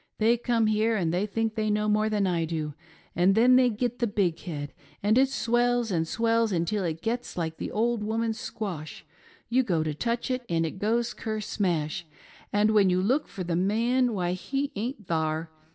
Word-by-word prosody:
Tliey 230 +2 +3
come 235 -2 +2
here 215 +1 +2
and 170 -5 0
fhey 195 +4 0
think 225 +1 -1
they 215 -1 -1
know 210 0 +1
more 215 +1 +2
than 210 -2 +1
I 175 -3 +1
do, 155 -2 -3 0.4
and 185 +3 +4
then 245 +3 +6
they 255 -1 +5
git 240 +2 -2
the 240 - +1
big 195 -5 0
head, 145 -5 -6 0.3
and 210 +2 +3
it 265 +1 +4
swells 240 -2 +1
and 165 -2 0
swells 230 +2 +1
until 185 +3 0
it 165 -1 -3
gits 240 -1 -3
like 160 -2 -2
the - - -4
old 230 0 0
woman's 225 +1 -1
squash— 175 -8 -6 0.4
you 250 +2 +3
go 175 -10 0
tio 155 -1 -2
touch 235 - -2
it 255 0 -1
and 165 -1 +1
it 165 +4 -5
goes 230 +3 0
ker 215 -1 -4
smash; 175 -6 -2 0.4
and 210 +1 +3
when 205 -3 +5
you 180 0 +2
look 255 +11 +1
for 185 - -6
the 170 -1 -2
man, 230 +6 +2
why 175 -2 0
he 275 +10 -2
aint 225 +1 -4
thar. 160 -1 -1
210 Hz, 200 wpm, -27 LUFS, 175-230 Hz, 0.4 s, then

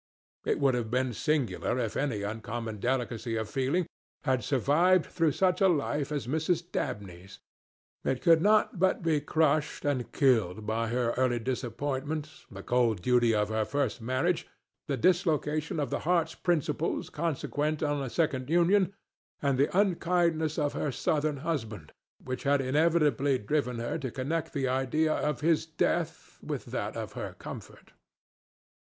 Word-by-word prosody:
It - - +1
would 135 -2 +3
have 120 -2 -2
been 125 +1 0
singular 135 0 0
if 115 -4 -2
any 120 -8 -1
uncommon 110 +1 -4
delicacy 120 -1 -1
of 110 -1 -2
feeling 140 +6 +1 0.4
had 130 -4 +1
survived 150 - +3
through 165 -4 +1
such 185 +2 +1
a 195 - +6
life 145 -3 0
as 145 -6 -2
Mrs. 160 +5 0
Dabney's; 95 -1 -5 0.7
it 130 -1 0
could 165 -2 +5
not 210 -1 +3
but 190 0 +2
be 160 -3 +2
crushed 155 -1 +1
and 135 -4 -1
killed 110 - +2
by 115 +1 -1
her 120 0 0
early 130 -2 +2
disappointment, 135 +5 -3
the 100 0 -9
cold 115 -7 +1
duty 120 -2 +3
of 105 0 +1
her 110 0 +1
first 135 -1 -1
marriage, 130 +9 0 0.4
the 140 -3 -1
dislocation 155 - +1
of 140 -4 -2
the - - -1
heart's 165 -1 +1
principles 165 -2 -1
consequent 155 -1 -1
on 145 -1 0
a 135 - -3
second 135 -3 -1
union, 185 +4 +3 0.4
and 140 -2 0
the 140 - +4
unkindness 170 -5 +1
of 145 -2 0
her 145 - -1
Southern 150 +3 0
husband, 110 - -3 0.3
which 130 0 -4
had 140 0 +2
inevitably 145 -1 +2
driven 125 +2 -1
her 120 +7 -3
to 135 -3 -3
connect 140 +7 -2
the 135 -3 0
idea 135 +5 +1
of 150 -4 -1
his 160 0 +2
death 110 - -2
with - - -4
that - - -4
of - - -5
her - - -6
comfort. - - -10
140 Hz, 155 wpm, -29 LUFS, 120-160 Hz, 0.7 s, a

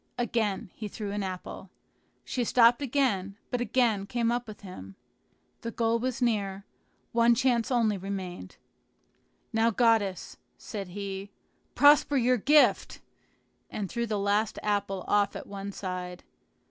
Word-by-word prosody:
Again 220 -5 -1
he 215 - -6
threw 205 0 -6
an 205 0 -2
apple. 190 0 -6 0.6
She 250 - -1
stopped 235 +2 +5
again, 225 -8 0
but 245 - -1
again 225 -4 +1
came 235 0 0
up 240 0 -2
with 215 -1 -10
him. 100 - -10 0.7
The 230 - -4
goal 230 0 0
was 255 +1 -2
near; 200 -4 -1 0.5
one 235 0 +4
chance 240 -1 +1
only 225 -6 +1
remained. 185 - -6 1.0
"Now, 225 +1 +3
goddess," 220 -5 +1 0.2
said 200 -4 -6
he, 195 +1 -6 0.5
"prosper 290 0 +5
your 250 0 +3
gift!" 290 +7 +3 0.7
and 200 -3 -5
threw 235 0 -2
the 210 -1 -1
last 205 +2 0
apple 200 -2 -1
off 205 -1 +2
at - - -6
one 200 0 -6
side. 180 -2 -6
210 Hz, 135 wpm, -28 LUFS, 195-235 Hz, 1.0 s, stopped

